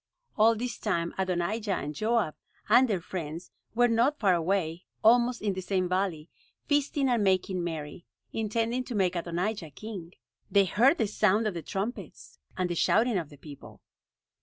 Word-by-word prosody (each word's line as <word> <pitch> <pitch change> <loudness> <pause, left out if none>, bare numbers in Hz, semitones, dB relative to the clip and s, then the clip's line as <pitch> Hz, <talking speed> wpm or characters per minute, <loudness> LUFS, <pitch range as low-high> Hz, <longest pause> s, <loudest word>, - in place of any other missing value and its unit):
All 225 +1 +5
this 240 +2 -4
time 170 -5 -1
Adonijah 190 +3 -1
and 150 +2 -4
Joab, 215 -1 0 0.3
and 245 +4 +6
their 195 -6 -1
friends 170 -1 -6 0.2
were 245 +1 +5
not 240 +6 +2
far 195 -4 +3
away, 170 -1 -1 0.2
almost 240 +1 +4
in 205 -2 +1
the 185 - -4
same 185 -1 0
valley, 180 -4 -1 0.4
feasting 290 -1 +1
and 240 -4 +2
making 185 -1 +1
merry, 165 0 -6 0.3
intending 230 +3 -1
to 245 - -5
make 185 -3 +1
Adonijah 175 +2 -2
king. 185 +1 -8 0.4
They 200 -1 +4
heard 250 - +4
the 225 - +1
sound 210 +1 +2
of 210 - 0
the 170 - -5
trumpets, 200 - -6 0.2
and 185 -1 0
the 175 - -2
shouting 220 +5 +2
of 160 -4 -7
the 145 - -14
people. 145 0 -12
195 Hz, 165 wpm, -28 LUFS, 175-225 Hz, 0.4 s, and